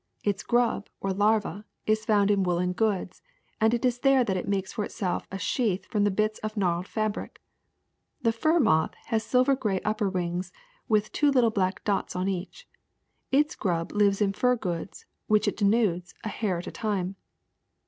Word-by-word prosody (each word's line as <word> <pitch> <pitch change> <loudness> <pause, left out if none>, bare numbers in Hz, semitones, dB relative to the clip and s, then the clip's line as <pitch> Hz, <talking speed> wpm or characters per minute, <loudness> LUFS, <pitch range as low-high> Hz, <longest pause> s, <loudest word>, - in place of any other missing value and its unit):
Its 205 -2 0
grub, 235 -3 +1
or 195 -1 -1
larva, 210 -1 +1 0.2
is 215 0 +1
found 205 -1 +3
in 200 -1 +2
woolen 180 0 0
goods, 195 -3 -1 0.4
and 220 +1 +4
it 240 +1 0
is 245 -1 +1
there 270 -1 +4
that 195 -5 -1
it 180 - -3
makes 195 -1 -1
for 210 - -2
itself 185 -3 -3
a 195 - -3
sheath 205 -2 0
from 210 -2 0
the - - +4
bits 215 +2 0
of 215 0 -5
the - - -2
gnawed 180 -1 0
fabric. 215 0 -3 0.8
*'The 230 - +4
fur 310 +9 +2
moth 160 - +2
has 220 -1 +1
silver 255 +3 +3
gray 210 -7 -1
upper 210 -1 0
wings 180 -1 -2 0.4
with 215 -3 +1
two 295 - +3
little 250 -5 +4
black 190 -2 -1
dots 200 -3 -1
on 180 +1 -1
each. 195 - -4 0.6
Its 295 +3 +3
grub 170 -4 -1
lives 205 -1 +2
in 195 -1 +2
fur 250 +4 +2
goods, 180 -5 -5 0.2
which 215 -1 +3
it - - +1
denudes, 200 -4 +1
a 215 - -3
hair 200 -3 -1
at 170 - -6
a - - -6
time. 195 -4 -2
205 Hz, 190 wpm, -27 LUFS, 185-225 Hz, 0.8 s, and